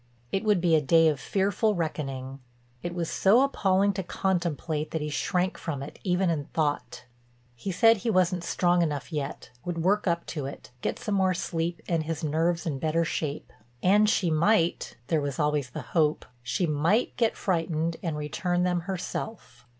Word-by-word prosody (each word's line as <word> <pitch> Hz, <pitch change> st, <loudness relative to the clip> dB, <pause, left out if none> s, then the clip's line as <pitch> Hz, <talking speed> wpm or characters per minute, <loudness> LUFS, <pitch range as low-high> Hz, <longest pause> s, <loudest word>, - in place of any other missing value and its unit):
It 195 Hz, -, 0 dB
would 210 Hz, -5 st, +3 dB
be 170 Hz, -2 st, +3 dB
a 155 Hz, -, +4 dB
day 165 Hz, +3 st, +5 dB
of 145 Hz, -3 st, -2 dB
fearful 200 Hz, -, +1 dB
reckoning; 135 Hz, -5 st, -4 dB, 0.4 s
it 175 Hz, 0 st, -4 dB
was 170 Hz, -2 st, -1 dB
so 215 Hz, +11 st, +4 dB
appalling 200 Hz, -7 st, +2 dB
to 190 Hz, -, -2 dB
contemplate 170 Hz, -4 st, -1 dB
that 160 Hz, -, -3 dB
he 150 Hz, 0 st, -3 dB
shrank 180 Hz, +4 st, 0 dB
from 140 Hz, -5 st, -4 dB
it 140 Hz, -, -10 dB
even 180 Hz, -1 st, +2 dB
in 145 Hz, -3 st, -2 dB
thought. 140 Hz, -6 st, -2 dB, 0.5 s
He 190 Hz, +11 st, -4 dB
said 225 Hz, +5 st, +5 dB
he 230 Hz, +4 st, -2 dB
wasn't 185 Hz, -3 st, +2 dB
strong 175 Hz, 0 st, +2 dB
enough 150 Hz, 0 st, -2 dB
yet, 140 Hz, -5 st, -4 dB
would 170 Hz, -2 st, -3 dB
work 205 Hz, +3 st, +2 dB
up 170 Hz, -1 st, 0 dB
to 145 Hz, -5 st, -3 dB
it, 140 Hz, -, -10 dB
get -, -, -2 dB
some 210 Hz, -, -3 dB
more 190 Hz, -2 st, +2 dB
sleep 170 Hz, 0 st, -3 dB
and 165 Hz, -2 st, +1 dB
his 160 Hz, 0 st, -4 dB
nerves 165 Hz, +4 st, 0 dB
in 145 Hz, -5 st, -2 dB
better 160 Hz, +2 st, +1 dB
shape. 150 Hz, -2 st, -3 dB, 0.3 s
And 210 Hz, +3 st, +5 dB
she 185 Hz, -6 st, +2 dB
might—there 165 Hz, -, +1 dB
was 140 Hz, -2 st, -3 dB
always 150 Hz, -3 st, 0 dB
the -, -, -6 dB
hope—she 150 Hz, -2 st, 0 dB
might 165 Hz, +9 st, +1 dB
get 230 Hz, -2 st, +1 dB
frightened 165 Hz, -2 st, -1 dB
and 165 Hz, -4 st, -2 dB
return 175 Hz, +4 st, -1 dB
them 180 Hz, -1 st, +1 dB
herself. 190 Hz, -, -5 dB
170 Hz, 175 wpm, -27 LUFS, 150-185 Hz, 0.5 s, day